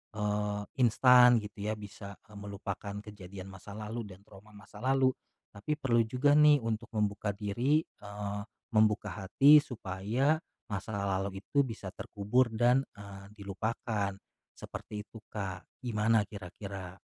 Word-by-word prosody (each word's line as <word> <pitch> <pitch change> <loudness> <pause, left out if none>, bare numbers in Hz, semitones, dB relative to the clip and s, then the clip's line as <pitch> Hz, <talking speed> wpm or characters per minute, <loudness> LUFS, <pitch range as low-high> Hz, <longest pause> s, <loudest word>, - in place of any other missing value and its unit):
eee, 105 -1 -1 0.2
instan 125 +1 +7
gitu 105 0 -6
ya 110 - 0
bisa, 100 -1 -9 0.2
eee, 105 - -11
melupakan 100 0 -5
kejadian 95 -2 -9
masa 95 +2 -10
lalu 110 +1 -5
dan 95 +1 -13
trauma 105 +1 -16
masa 105 0 -13
lalu. 130 +1 +3 0.4
Tapi 105 +10 -3
perlu 125 -6 +2
juga 130 +5 +2
nih 150 -3 +6
untuk 110 -1 -2
membuka 100 -1 0
diri, 120 +10 +1
eee, 100 0 -6 0.3
membuka 105 -2 +3
hati 140 +10 +7
supaya 120 +3 -1 0.3
masa 100 +2 -3
lalu 100 0 -2
itu 140 - 0
bisa 105 -5 -6
terkubur 110 +7 +1
dan, 125 +4 +3
eee, 100 0 -11
dilupakan. 100 0 -2 0.4
Seperti 105 -1 -7
itu, 115 +1 -13
Kak. 95 -4 -5 0.2
Gimana 110 -2 +2
kira-kira? 95 -2 -8
105 Hz, 135 wpm, -31 LUFS, 100-115 Hz, 0.4 s, instan